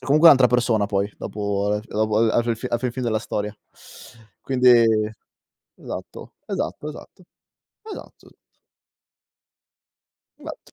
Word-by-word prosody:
comunque 155 +4 +4
un'altra 135 -5 +8
persona 120 -4 +1
poi, 100 0 -1
dopo 100 -1 -3
al 105 0 -1
f - - -20
dopo 110 0 0
al 115 0 +3
alla 120 - +2
fi 120 0 -1
fi 110 - -6
alla 120 - -1
fi 125 0 -2
fin 130 +2 -5
della 115 -3 0
storia. 105 -2 -4 0.9
Quindi 130 -1 +2 1.1
esatto, - - -9
esatto, 150 - -4
esatto, 155 +4 -12 0.6
esatto. 435 -1 -12 2.0
Esatto. - - -11
115 Hz, 130 wpm, -22 LUFS, 105-130 Hz, 2.0 s, un'altra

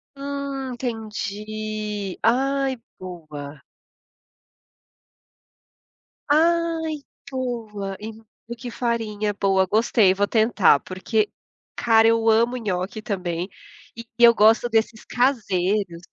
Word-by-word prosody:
Hum, 275 -1 -4
entendi! 215 -3 -4
Ai, 270 +3 +2 0.2
boa. 155 -6 -9 2.7
Ai, 325 0 +2 0.3
boa, 225 -7 -4
e 220 +1 -6 0.4
e 235 - -4
que 240 +1 -7
farinha 220 -3 -2
boa, 190 -1 +3
gostei, 210 -1 +3
vou 200 +1 0
tentar. 215 - +4
Porque, 205 +3 -1 0.4
cara, 225 -1 +4
eu 230 0 +3
amo 235 +3 +3
nhoque 200 -1 -3
também 180 -3 -3 0.5
e 230 0 -8
eu 235 -1 +8
gosto 225 +3 +5
desses 225 -1 0
caseiros. 200 -8 0
220 Hz, 95 wpm, -23 LUFS, 195-245 Hz, 2.7 s, eu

